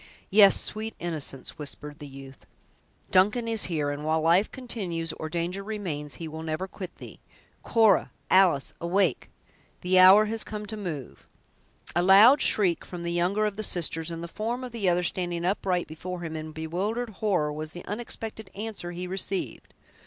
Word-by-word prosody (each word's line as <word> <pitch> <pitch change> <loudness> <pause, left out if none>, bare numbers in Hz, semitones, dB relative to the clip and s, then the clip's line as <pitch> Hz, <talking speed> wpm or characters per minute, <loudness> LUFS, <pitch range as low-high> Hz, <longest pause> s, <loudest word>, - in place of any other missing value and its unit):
"Yes, 200 0 +7
sweet 220 +1 -3
innocence," 155 -6 -2
whispered 150 0 -7
the 145 - -8
youth; 135 -1 -13 0.6
"Duncan 210 +6 +3
is 225 -2 +1
here, 150 -5 -1
and 145 +1 -5
while 160 +1 +1
life 170 +6 +3
continues 180 - -3
or 155 - -6
danger 175 +4 -3
remains, 175 -9 -4
he 165 - -6
will 160 +1 -7
never 160 +4 -3
quit 185 -1 -9
thee. - - -11 0.4
Cora! 220 -5 +3 0.2
Alice! 185 -7 +4
awake! 175 -3 +1 0.5
The 185 +1 +3
hour 190 +3 +8
has 220 +1 -3
come 210 -1 -6
to 220 - -6
move!" 170 - -7 0.7
A 175 - +3
loud 205 +10 +7
shriek 185 -5 +3
from 175 -2 -8
the 170 0 -2
younger 185 +5 +1
of 210 -1 -3
the - - -2
sisters, 165 -3 +1
and 165 0 -6
the - - -5
form 230 +8 -4
of 250 - -6
the 215 -5 0
other 175 0 +1
standing 175 -1 -1
upright 185 -2 0
before 175 +3 -7
him, 160 -2 -5
in 155 0 -6
bewildered 190 +10 -3
horror, 175 -9 +1
was 155 +1 -6
the 175 - -9
unexpected 220 -1 -6
answer 210 -4 -5
he 180 +1 -5
received. 190 +1 -3
180 Hz, 175 wpm, -27 LUFS, 160-210 Hz, 0.7 s, hour